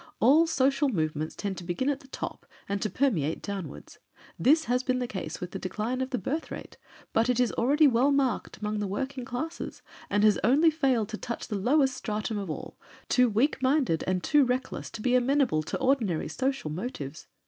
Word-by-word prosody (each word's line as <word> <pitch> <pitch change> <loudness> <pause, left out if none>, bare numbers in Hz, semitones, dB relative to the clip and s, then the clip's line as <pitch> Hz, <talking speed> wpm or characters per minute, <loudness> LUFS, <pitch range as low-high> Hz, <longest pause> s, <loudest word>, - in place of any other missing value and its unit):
All 300 +8 +5
social 275 -2 +2
movements 155 - -2
tend 200 -3 -4
to - - -9
begin 175 +9 -2
at 285 -1 +1
the 270 - -17
top - - -6 0.2
and 200 0 -2
to 215 - 0
permeate 180 - 0
downwards. 200 -3 -7 0.4
This 315 +4 +4
has 250 +1 +1
been 255 -1 0
the 250 - -1
case 180 -8 -5
with 180 0 -6
the 195 - -5
decline 220 +7 -2
of 260 - -2
the 255 - -1
birth 305 +6 -3
rate, - - -9 0.3
but 225 +2 +2
it 250 -1 +2
is 250 -2 +3
already 285 +6 +3
well 265 +1 +4
marked 275 -2 0
among 210 0 -2
the 205 - -1
working 260 +6 -3
classes, 315 +9 -5 0.3
and 205 +1 +2
has 215 -2 +5
only 290 +9 +5
failed 260 -9 +1
to 220 - -4
touch 235 - -5
the 215 - -2
lowest 265 +6 +2
stratum 215 -2 -3
of 195 -3 -5
all, 155 - -6 0.3
too 250 -1 +4
weak 255 +6 +1
minded 260 - +2
and 185 -1 0
too 295 -2 +4
reckless 255 0 -2
to 220 - -8
be 250 - +2
amenable 255 - +3
to 155 - -4
ordinary 255 - +1
social 260 - -2
motives. 155 - -6
245 Hz, 205 wpm, -28 LUFS, 200-270 Hz, 0.4 s, All